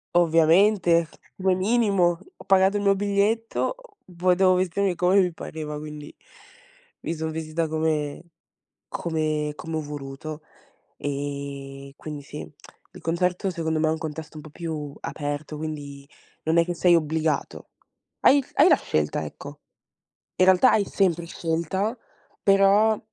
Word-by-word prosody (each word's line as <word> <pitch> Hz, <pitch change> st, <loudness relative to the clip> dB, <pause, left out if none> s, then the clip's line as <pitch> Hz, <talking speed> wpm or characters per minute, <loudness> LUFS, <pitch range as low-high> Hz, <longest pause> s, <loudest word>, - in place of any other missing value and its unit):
Ovviamente, 170 Hz, +1 st, +4 dB, 0.3 s
come 190 Hz, -1 st, +2 dB
minimo. 195 Hz, -4 st, +2 dB, 0.2 s
Ho -, -, -14 dB
pagato 195 Hz, +1 st, +4 dB
il 205 Hz, -, 0 dB
mio 200 Hz, 0 st, +4 dB
biglietto, 205 Hz, -, 0 dB, 0.4 s
poi 180 Hz, 0 st, +3 dB
devo 185 Hz, 0 st, +4 dB
vestirmi 185 Hz, +1 st, +1 dB
come 185 Hz, +3 st, +4 dB
mi 180 Hz, -1 st, +1 dB
pareva, 155 Hz, -2 st, -6 dB
quindi, 150 Hz, -1 st, -9 dB, 0.9 s
mi 165 Hz, -, -3 dB
son 160 Hz, 0 st, -3 dB
vestita 160 Hz, +1 st, -2 dB
come 155 Hz, -2 st, -1 dB, 0.7 s
come 155 Hz, -2 st, -2 dB
come 165 Hz, 0 st, -6 dB
ho -, -, -2 dB
voluto. 145 Hz, +1 st, -7 dB, 0.6 s
Ehm, 140 Hz, -1 st, -5 dB
quindi 150 Hz, -2 st, -7 dB
sì, 150 Hz, +1 st, -8 dB, 0.4 s
il -, -, -12 dB
concerto 180 Hz, +3 st, 0 dB
secondo 160 Hz, -2 st, -2 dB
me 155 Hz, -, +2 dB
è -, -, +2 dB
un 160 Hz, -, -1 dB
contesto 160 Hz, 0 st, -7 dB
un 150 Hz, -, -8 dB
po' 155 Hz, -, -11 dB
più 150 Hz, -3 st, -5 dB
aperto, 145 Hz, +1 st, -4 dB
quindi 145 Hz, -2 st, -7 dB, 0.4 s
non 160 Hz, +1 st, +1 dB
è 170 Hz, -, +5 dB
che 175 Hz, -, -3 dB
sei 175 Hz, 0 st, +4 dB
obbligato. 160 Hz, -1 st, -1 dB, 0.5 s
Hai 280 Hz, 0 st, +5 dB
hai 290 Hz, +5 st, +6 dB
la -, -, +7 dB
scelta, -, -, -1 dB
ecco. -, -, -10 dB, 0.8 s
In 185 Hz, -, +4 dB
realtà 190 Hz, +7 st, +6 dB
hai 205 Hz, -, +3 dB
sempre 170 Hz, -4 st, 0 dB
scelta, 170 Hz, +7 st, -2 dB, 0.5 s
però 200 Hz, +2 st, +4 dB
165 Hz, 140 wpm, -25 LUFS, 150-190 Hz, 0.9 s, la